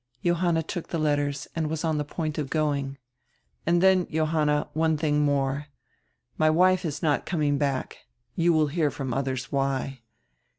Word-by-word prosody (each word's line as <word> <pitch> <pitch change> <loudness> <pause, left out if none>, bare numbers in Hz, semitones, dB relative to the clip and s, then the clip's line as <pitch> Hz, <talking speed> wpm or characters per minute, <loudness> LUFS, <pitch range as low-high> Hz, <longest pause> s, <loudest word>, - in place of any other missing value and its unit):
Johanna 175 -1 +2
took 165 +2 -5
die 170 - -2
letters 145 -2 0
and 160 -2 -1
was 160 +1 -3
on 155 -2 0
die - - 0
point 155 +1 -4
of 145 -3 -3
going. 140 -3 -1 0.7
"And 175 +1 +3
then, 190 -2 +4
Johanna, 155 -2 +1
one 160 0 +2
diing 150 -1 +1
more. 140 0 0 0.7
My 155 0 +5
wife 180 +3 +4
is 155 +1 -4
not 150 -3 +1
coming 150 -5 +1
back. 140 -3 -2 0.4
You 170 0 +3
will 155 -2 +3
hear 150 +1 0
from 135 -3 -4
others 130 -1 -2
why. 135 -1 -1
150 Hz, 165 wpm, -26 LUFS, 140-165 Hz, 0.7 s, My